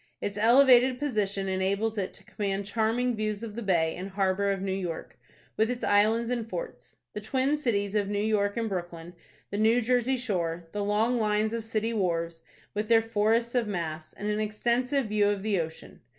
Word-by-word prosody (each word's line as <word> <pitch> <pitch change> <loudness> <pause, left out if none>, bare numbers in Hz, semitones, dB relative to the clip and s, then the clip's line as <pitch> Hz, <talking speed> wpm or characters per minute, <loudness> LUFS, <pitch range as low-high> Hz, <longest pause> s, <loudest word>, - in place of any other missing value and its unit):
Its 205 - -3
elevated 250 +3 +5
position 205 -8 -1
enables 195 +4 0
it 195 -3 -2
to - - -10
command 200 -1 -3
charming 230 +3 0
views 215 0 -2
of 220 -2 -6
the 235 - -5
bay 170 -6 +1
and 185 +2 -6
harbor 195 0 +1
of 195 - -1
New 190 0 -2
York; 180 -4 -4 0.4
with 220 +1 +2
its 250 -1 -3
islands 220 +4 +3
and 230 -2 -2
forts, - - -7 0.2
the 210 - -5
twin 260 +6 +1
cities 210 -9 -1
of 205 -2 0
New 205 - -1
York 205 0 +1
and 230 -1 0
Brooklyn, 175 -3 -5 0.4
the 200 - -2
New 225 +3 +4
Jersey 250 +2 +1
shore, 175 -8 -2
the 205 0 -2
long 220 +4 +1
lines 215 0 +1
of 230 -1 -3
city 225 +1 -2
wharves, 170 -5 -1 0.3
with 210 +1 -2
their 225 0 +5
forests 225 +1 +1
of 245 -3 +1
masts, 160 -5 -4
and 205 - -6
an 210 0 0
extensive 240 +5 0
view 210 -1 +2
of 200 -1 -2
the 210 -3 +1
ocean. 160 0 -9
210 Hz, 195 wpm, -28 LUFS, 195-230 Hz, 0.4 s, elevated